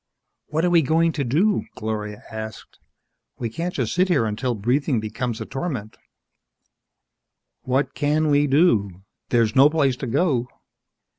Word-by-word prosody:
"What 160 Hz, +3 st, 0 dB
are -, -, +3 dB
we 170 Hz, -1 st, +5 dB
going 165 Hz, +3 st, +2 dB
to 150 Hz, -2 st, -2 dB
do?" 175 Hz, -, +1 dB
Gloria 105 Hz, -1 st, -5 dB
asked. 110 Hz, 0 st, -8 dB, 0.6 s
"We 115 Hz, -2 st, -4 dB
can't 170 Hz, +8 st, -4 dB
just -, -, -1 dB
sit 185 Hz, +1 st, +2 dB
here 145 Hz, -11 st, +2 dB
until 115 Hz, +3 st, -2 dB
breathing 125 Hz, +5 st, 0 dB
becomes 110 Hz, +2 st, -4 dB
a -, -, -5 dB
torment 135 Hz, -7 st, -5 dB, 0.9 s
" -, -, -59 dB, 0.7 s
"What 130 Hz, +1 st, 0 dB
can 150 Hz, +1 st, +1 dB
we 145 Hz, 0 st, +3 dB
do? 110 Hz, -, +2 dB, 0.3 s
There's 115 Hz, -3 st, +2 dB
no 135 Hz, +2 st, +7 dB
place 145 Hz, -5 st, +1 dB
to 130 Hz, -, -5 dB
go!" 130 Hz, -2 st, +1 dB
135 Hz, 150 wpm, -23 LUFS, 110-155 Hz, 0.9 s, no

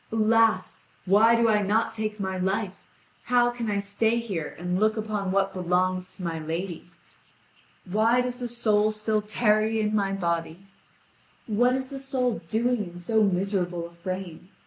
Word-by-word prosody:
Alas! 220 Hz, -3 st, +2 dB, 0.3 s
why 215 Hz, +5 st, +5 dB
do 230 Hz, 0 st, +3 dB
I 210 Hz, -2 st, +3 dB
not 210 Hz, +3 st, +1 dB
take 215 Hz, -1 st, -4 dB
my 190 Hz, -1 st, -2 dB
life? 190 Hz, +1 st, -2 dB, 0.4 s
How 245 Hz, -1 st, +3 dB
can 240 Hz, -2 st, -4 dB
I 205 Hz, -, 0 dB
stay 205 Hz, +3 st, 0 dB
here 195 Hz, -10 st, -4 dB
and 180 Hz, +2 st, -2 dB
look 215 Hz, +1 st, +2 dB
upon 210 Hz, -3 st, -2 dB
what 195 Hz, 0 st, +1 dB
belongs 185 Hz, 0 st, -1 dB
to 190 Hz, -, -9 dB
my 165 Hz, -2 st, -3 dB
lady? 170 Hz, +3 st, -5 dB, 1.0 s
Why 220 Hz, +6 st, +2 dB
does 250 Hz, 0 st, -4 dB
the 245 Hz, -, -3 dB
soul 215 Hz, -3 st, +2 dB
still 215 Hz, 0 st, 0 dB
tarry 215 Hz, +1 st, +1 dB
in 210 Hz, 0 st, 0 dB
my 200 Hz, -2 st, +1 dB
body? 170 Hz, -1 st, -2 dB, 0.8 s
What 245 Hz, +4 st, +2 dB
is 260 Hz, 0 st, -4 dB
the 275 Hz, -, -5 dB
soul 260 Hz, -3 st, -1 dB
doing 235 Hz, 0 st, 0 dB
in -, -, -10 dB
so 220 Hz, +5 st, +1 dB
miserable 180 Hz, -3 st, 0 dB
a 170 Hz, -, -11 dB
frame? 180 Hz, 0 st, -6 dB
210 Hz, 165 wpm, -26 LUFS, 185-225 Hz, 1.0 s, why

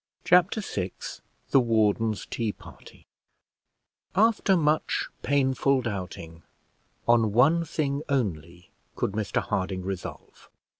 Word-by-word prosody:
Chapter 180 Hz, +4 st, +4 dB
VI 95 Hz, -, -4 dB, 0.6 s
THE 135 Hz, -, +6 dB
WARDEN'S 110 Hz, -2 st, +1 dB
TEA 110 Hz, -3 st, -2 dB
PARTY -, -, -15 dB, 1.1 s
After 210 Hz, -2 st, +3 dB
much 155 Hz, -1 st, +1 dB
painful 135 Hz, -1 st, +2 dB
doubting, 90 Hz, -6 st, -6 dB, 0.7 s
on 115 Hz, -3 st, +4 dB
one 150 Hz, +9 st, +4 dB
thing 145 Hz, -3 st, -2 dB
only 90 Hz, -, -3 dB, 0.2 s
could -, -, -1 dB
Mr 105 Hz, -2 st, -1 dB
Harding 95 Hz, 0 st, -2 dB
resolve. 95 Hz, -1 st, -7 dB
115 Hz, 100 wpm, -26 LUFS, 95-145 Hz, 1.1 s, THE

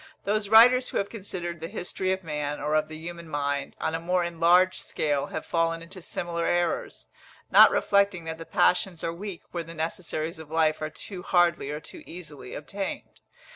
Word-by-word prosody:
Those 205 Hz, 0 st, 0 dB
writers 250 Hz, +3 st, +7 dB
who -, -, -2 dB
have 200 Hz, -, -1 dB
considered 180 Hz, -5 st, -5 dB
the 165 Hz, -, -5 dB
history 185 Hz, -1 st, -2 dB
of 190 Hz, 0 st, -2 dB
man, 150 Hz, -2 st, -3 dB
or 150 Hz, +2 st, -1 dB
of 155 Hz, 0 st, +2 dB
the 155 Hz, 0 st, -8 dB
human 170 Hz, 0 st, -8 dB
mind, 145 Hz, -1 st, -2 dB
on 160 Hz, -, -1 dB
a 165 Hz, -, -1 dB
more 180 Hz, +2 st, +1 dB
enlarged 175 Hz, +2 st, +3 dB
scale 145 Hz, -2 st, -1 dB
have 160 Hz, -, -5 dB
fallen 165 Hz, 0 st, 0 dB
into 185 Hz, +3 st, -9 dB
similar 170 Hz, 0 st, -3 dB
errors, 175 Hz, -, -1 dB, 0.5 s
not -, -, +9 dB
reflecting 200 Hz, -3 st, +2 dB
that 160 Hz, 0 st, -5 dB
the 165 Hz, -, -7 dB
passions 180 Hz, -1 st, +2 dB
are 165 Hz, -, -1 dB
weak 190 Hz, 0 st, -7 dB
where 170 Hz, -1 st, -3 dB
the 165 Hz, +1 st, -10 dB
necessaries 160 Hz, 0 st, -3 dB
of 160 Hz, -2 st, -10 dB
life 155 Hz, -1 st, +2 dB
are 155 Hz, -, -2 dB
too 185 Hz, +3 st, -8 dB
hardly 175 Hz, -6 st, +2 dB
or 150 Hz, +1 st, -3 dB
too -, -, -12 dB
easily 155 Hz, -7 st, -9 dB
obtained. 195 Hz, +6 st, -6 dB
170 Hz, 190 wpm, -27 LUFS, 155-185 Hz, 0.5 s, not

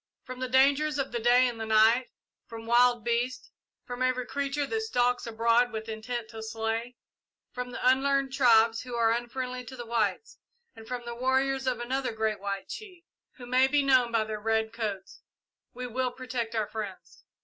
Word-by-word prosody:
From 255 Hz, 0 st, -8 dB
the 255 Hz, -, -2 dB
dangers 280 Hz, +3 st, +3 dB
of 275 Hz, -1 st, -2 dB
the 240 Hz, -, -2 dB
day 245 Hz, +2 st, +5 dB
and 235 Hz, -2 st, -5 dB
the -, -, -2 dB
night, 220 Hz, +3 st, +4 dB, 0.4 s
from 225 Hz, 0 st, -9 dB
wild 240 Hz, 0 st, +4 dB
beasts, 240 Hz, +2 st, -1 dB, 0.3 s
from 245 Hz, 0 st, -6 dB
every 255 Hz, -1 st, +1 dB
creature 280 Hz, +1 st, -2 dB
that 445 Hz, +8 st, -2 dB
stalks 245 Hz, -, 0 dB
abroad 230 Hz, +2 st, +2 dB
with 220 Hz, 0 st, -5 dB
intent 225 Hz, +1 st, -5 dB
to 225 Hz, -1 st, -8 dB
slay; 225 Hz, +2 st, -3 dB, 0.6 s
from 250 Hz, 0 st, -5 dB
the 245 Hz, -, -2 dB
unlearned 270 Hz, +1 st, +2 dB
tribes 230 Hz, -4 st, +4 dB
who 250 Hz, -1 st, -7 dB
are 230 Hz, -1 st, +3 dB
unfriendly 250 Hz, +2 st, -3 dB
to 260 Hz, -, -9 dB
the 240 Hz, -2 st, -7 dB
whites, 230 Hz, -, -2 dB, 0.4 s
and 225 Hz, -1 st, -13 dB
from 245 Hz, -1 st, -5 dB
the 235 Hz, -, -5 dB
warriors 265 Hz, +2 st, 0 dB
of 255 Hz, -, 0 dB
another 255 Hz, 0 st, -2 dB
White 200 Hz, -3 st, -2 dB
Chief, 400 Hz, -5 st, -9 dB, 0.3 s
who 245 Hz, -, -11 dB
may 255 Hz, +2 st, +4 dB
be 285 Hz, +1 st, +2 dB
known 255 Hz, -3 st, +4 dB
by 225 Hz, -1 st, +2 dB
their 215 Hz, 0 st, -5 dB
red 220 Hz, +1 st, 0 dB
coats, 205 Hz, -4 st, -5 dB, 0.5 s
we 250 Hz, -, -6 dB
will 255 Hz, +1 st, -1 dB
protect 245 Hz, -2 st, -5 dB
our 220 Hz, -1 st, +1 dB
friends. 205 Hz, -4 st, -8 dB
245 Hz, 180 wpm, -28 LUFS, 225-260 Hz, 0.6 s, day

